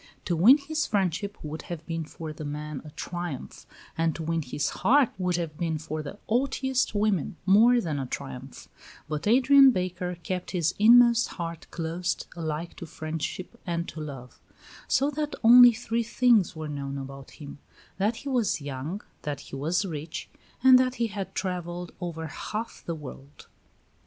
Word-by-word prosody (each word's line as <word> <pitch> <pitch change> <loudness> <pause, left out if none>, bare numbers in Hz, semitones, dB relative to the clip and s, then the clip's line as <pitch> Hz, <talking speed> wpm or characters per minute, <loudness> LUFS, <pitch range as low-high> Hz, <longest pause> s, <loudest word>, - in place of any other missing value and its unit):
To 175 - 0
win 220 - +7
his 305 +2 -2
friendship 200 0 -1
would 155 +1 -5
have 165 -2 -6
been 165 -1 -3
for 155 0 -7
the 155 - -8
men 150 0 -5
a 155 - -10
triumph; 175 -2 -6 0.3
and 165 -1 0
to 165 - -5
win 165 +1 0
his 145 +1 -2
heart 275 0 +5
would 180 -1 +1
have 165 -3 -3
been 165 -2 -1
for 155 0 -5
the 150 +7 -8
haughtiest 260 0 0
woman 205 -6 +1
more 225 +6 +6
than 160 -9 -2
a 135 - -3
triumph; 135 0 -7 0.4
but 155 +4 -3
Adrian 265 +4 +7
Baker 180 -4 -2
kept 180 +2 -3
his 170 0 +1
inmost 235 +2 +7
heart 170 -2 -5
closed 170 +1 -3
alike 160 0 -4
to 170 - -7
friendship 160 +3 -5
and 170 -1 -2
to - - -8
love; 135 -5 -9 0.5
so 280 +2 +2
that 300 +1 -3
only 245 +1 +10
three 235 0 -2
things 230 -5 +3
were 155 -1 -5
known 140 -1 -4
about 135 0 -8
him 145 -1 -10 0.4
that 210 +4 +1
he 280 - -9
was 240 - +1
young, 145 +7 -5 0.2
that 145 -2 -4
he 135 - -9
was 165 +8 0
rich, 160 -2 -6 0.3
and 260 -1 +8
that 255 0 +1
he 235 - 0
had 195 -2 -5
travelled 180 -2 -4
over 165 -2 -4
half 215 +8 -5
the 170 - -2
world. 140 -1 -11
175 Hz, 170 wpm, -27 LUFS, 155-225 Hz, 0.5 s, only